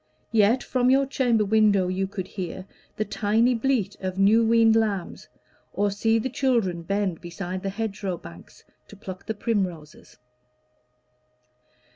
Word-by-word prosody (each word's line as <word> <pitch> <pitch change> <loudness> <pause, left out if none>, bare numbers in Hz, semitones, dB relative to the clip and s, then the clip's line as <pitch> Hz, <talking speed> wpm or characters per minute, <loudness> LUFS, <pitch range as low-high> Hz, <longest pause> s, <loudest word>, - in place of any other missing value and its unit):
Yet 225 +2 +3
from 250 -1 +1
your 270 +1 +4
chamber 245 -5 +1
window 205 -3 +3
you 190 +1 -1
could 190 -1 -6
hear 185 -1 -6 0.3
The 215 - -2
tiny 225 +5 +1
bleat 245 -3 0
of 185 0 -4
new 205 +4 +5
yeaned 225 0 +4
lambs, 205 -5 -1 0.5
or 205 0 0
see 225 +3 +1
The 225 - -1
children 235 -10 0
bend 195 -1 -2
beside 180 +2 -6
the 195 - -3
hedgerow 200 -3 -4
banks 85 - -14 0.2
To - - -13
pluck 190 -2 -9
the 220 - -2
primroses. 185 -9 -4
205 Hz, 140 wpm, -25 LUFS, 185-225 Hz, 0.5 s, new